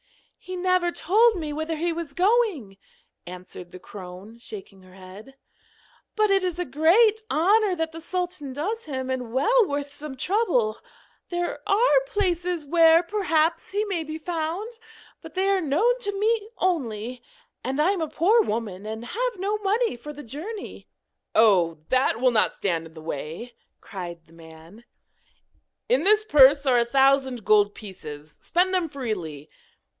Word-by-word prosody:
'He 370 - -7
never 365 -1 +1
told 435 +8 +3
me 310 -4 -4
whither 315 +2 -3
he 335 +2 -1
was 325 -4 -6
going,' 370 - +1 0.5
answered 180 0 -9
the 185 - -11
crone, 190 +4 -11
shaking 200 -4 -10
her 185 0 -17
head. 195 +8 -13 0.8
'But 430 -2 +2
it 390 -1 +3
is 360 -2 -2
a 355 - -2
great 380 - +4
honour 395 +4 +3
that 325 -1 -2
the 325 +1 -9
sultan 355 -4 -4
does 405 - -3
him, 260 -3 -4
and 250 -3 -4
well 435 - +3
worth 285 -1 -4
some 290 -2 -8
trouble. 270 - 0 0.5
There 350 0 -2
are 485 +5 +4
places 360 -7 -1
where, 330 +2 +5
perhaps, 335 -4 0
he 410 +2 0
may 370 -6 -2
be 310 0 -6
found, 335 +5 -3 0.5
but - - -12
they 380 +1 +1
are 395 -1 +2
known 405 - +2
to 405 -4 -4
me 435 0 +1
only, 250 - -2 0.4
and 265 +3 -3
I 325 +6 +4
am 390 -4 -2
a 320 - -1
poor 420 +11 +3
woman 215 - -4
and 220 +2 -6
have 485 - -2
no 405 +3 -1
money 425 - 0
for 270 +5 -9
the 295 0 -10
journey.' 330 - -8 0.5
'Oh! 185 -7 +4
that 255 -3 +2
will 255 0 +3
not 225 - +2
stand 165 -4 -2
in 160 - -18
the 160 - -11
way,' 160 - -6 0.3
cried 175 -4 -8
the 160 - -22
man. 165 +6 -15 1.0
'In - - +3
this 425 +2 +4
purse 285 -4 +6
are 250 -3 +4
a 235 - +2
thousand 265 -2 +2
gold 205 -1 +4
pieces; 150 -7 -10
spend 365 +2 +1
them 360 -3 0
freely. 180 - -5
305 Hz, 160 wpm, -25 LUFS, -, 1.0 s, purse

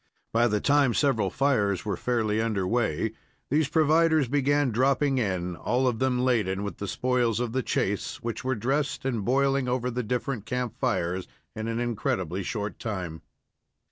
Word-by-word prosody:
By 120 +1 +4
the 105 -2 +1
time 140 -1 +3
several 115 -9 +2
fires 105 -8 +1
were 100 -3 -1
fairly 110 -2 0
under 105 -4 0
way, 115 0 0 0.4
these 150 0 +2
providers 160 -1 +3
began 145 0 +2
dropping 135 +3 +2
in, 90 -5 -1
all 125 +8 0
of 115 -3 0
them 125 -1 +1
laden 100 -6 +1
with 100 0 -5
spoils 125 -3 +1
of 120 -2 -1
the 130 - +1
chase, 100 -4 -1
which 115 -2 -4
were 130 0 0
dressed 135 +5 -1
and 120 -6 -1
boiling 135 +3 +2
over 125 0 0
the 125 +1 -2
different 125 0 -3
camp 125 -3 -2
fires 90 +2 -1 0.3
in 110 +1 -4
an 115 0 -2
incredibly 100 -6 -1
short 105 +1 -4
time. 90 -7 -4
120 Hz, 165 wpm, -27 LUFS, 105-130 Hz, 0.4 s, By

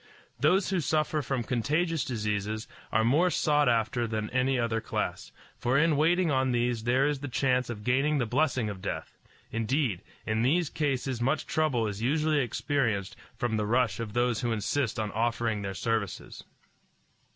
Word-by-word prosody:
Those 180 +9 +3
who 190 - +1
suffer 155 0 0
from 135 -3 -2
contagious 150 +8 0
diseases 110 -1 -2 0.2
are 110 - +3
more 150 +10 +4
sought 150 -3 +2
after 115 +1 +1
than 110 -1 -3
any 130 +1 +1
other 115 -2 0
class, 110 - -3 0.3
for 125 +2 +1
in 155 +1 +4
waiting 165 +3 +3
on 130 -1 +2
these 120 -1 0
there 130 +3 +3
is 145 -2 -1
the 145 - -5
chance 125 -1 +1
of 105 -3 -6
gaining 135 +6 +2
the 125 - +1
blessing 130 -1 +1
of 100 -3 -6
death; - - -5 0.3
indeed, 115 - 0 0.2
in 110 0 0
these 155 +6 +2
cases 135 -4 -1
much 135 +5 +1
trouble 145 -8 +1
is 105 0 -4
usually 150 +4 +2
experienced 120 -5 -1 0.2
from 120 -2 -1
the 105 -1 -1
rush 120 0 +1
of 110 -3 -4
those 120 -1 +1
who 120 - 0
insist 115 +2 -1
on 105 -1 -2
offering 115 -1 0
their 100 -1 -4
services. 110 -2 -3
125 Hz, 170 wpm, -28 LUFS, 110-145 Hz, 0.3 s, more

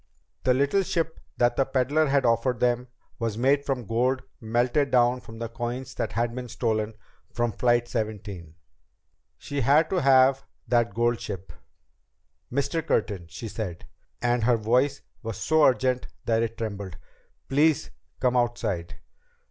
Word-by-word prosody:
That 125 -1 +4
little 140 +9 +2
ship 165 -3 -2 0.2
that 120 0 +2
the 135 - +4
peddler 135 +4 +1
had 135 -1 +2
offered 115 +1 +2
them 125 0 +1 0.3
was 115 -2 -2
made 140 +4 +3
from 130 -5 -2
gold 125 +5 +1 0.2
melted 120 +5 +1
down 125 0 +3
from 115 - -11
the 115 0 -4
coins 120 +3 -5
that - - -3
had 115 +2 0
been 125 0 -6
stolen 110 -2 -1 0.4
from 120 -1 0
Flight 120 +2 +2
17! 105 -8 -5 0.8
She 145 -1 -4
had 145 +6 +4
to 185 -2 +1
have 135 0 +5 0.2
that 115 -3 +2
gold 120 0 +2
ship! 95 -2 -6 1.0
"Mr. 140 +5 0
Curtin," 100 - -1
she 85 +8 -7
said, 100 -6 -5 0.4
and 120 -1 +2
her 120 -1 +4
voice 125 +6 +1 0.2
was 115 -4 -5
so 160 -1 +3
urgent 130 -1 +2 0.2
that 115 -1 +2
it 115 0 -2
trembled, 100 -4 -5 0.5
"please 150 +2 +2 0.3
come 125 -1 +2
outside." 115 -8 -1
120 Hz, 150 wpm, -26 LUFS, 115-135 Hz, 1.0 s, have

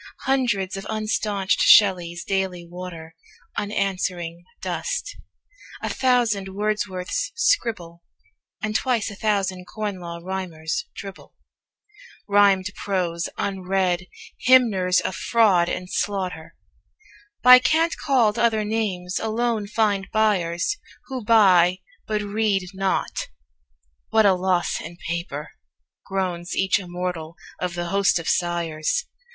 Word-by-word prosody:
Hundreds 230 -8 0
of 195 - -5
unstaunched 210 -2 0
Shelleys 175 -4 +5
daily 190 -3 -2
water 170 -2 -9 0.4
Unanswering 185 -4 -2
dust; - - -3 0.7
a - - -1
thousand 240 -7 +1
Wordsworths 205 - -2
scribble; 220 - 0 0.6
And 215 0 -2
twice 235 -4 0
a - - -9
thousand 195 -3 -1
Corn 205 -1 -4
Law 170 -1 -7
Rhymers 185 - -3
dribble - - -10 0.9
Rhymed 200 -2 +4
prose, 175 -4 -2
unread. 185 -2 -1 0.3
Hymners 215 -8 +4
of - - -3
fraud 195 -6 +3
and 180 - -4
slaughter, 185 -5 -3 0.9
By 250 0 +10
cant 320 +7 +2
called 245 -7 +2
other 220 -2 +2
names, 195 -5 -2
alone 225 -1 -1
find 205 -2 0
buyers 200 - +1 0.3
Who 260 -3 -4
buy, 185 -5 +5 0.3
but 215 -1 -1
read 205 -1 0
not. 190 0 -1 0.8
"What 220 -1 +4
a 195 - +6
loss 180 -1 0
in 170 - -9
paper," 165 -3 -4 0.6
Groans 180 -2 -2
each 190 +1 +2
immortal 175 -3 -5 0.2
of 180 -1 -3
the 175 0 -3
host 195 -1 +3
of 165 - -5
sighers! 170 - 0
195 Hz, 110 wpm, -23 LUFS, 180-215 Hz, 0.9 s, By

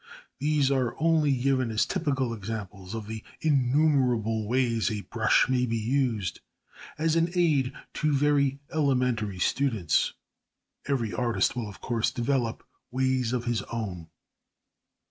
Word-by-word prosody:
These 145 -1 +2
are 130 -3 0
only 160 -2 +3
given 130 -1 +1
as 110 0 +1
typical 135 -9 -1
examples 105 -2 -6
of 110 -2 -5
the 110 0 -6 0.2
innumerable 125 -6 +2
ways 120 -2 +1
a 105 -2 -3
brush 110 +1 +2
may 125 -1 +1
be 115 0 -1
used 115 -4 0 0.6
as 160 +1 +1
an 165 +1 +2
aid 150 -7 +2 0.2
to 155 - 0
very 140 -1 +2 0.2
elementary 125 -9 +1
students; 110 - +1 0.7
every 125 -6 -1
artist 115 -6 +1
will, 115 -4 -3
of 100 - -12
course, 115 -2 0
develop 120 -2 -1 0.2
ways 130 -2 0
of 125 -1 -2
his 120 -2 0
own. 95 -8 -4
125 Hz, 130 wpm, -27 LUFS, 110-140 Hz, 0.7 s, only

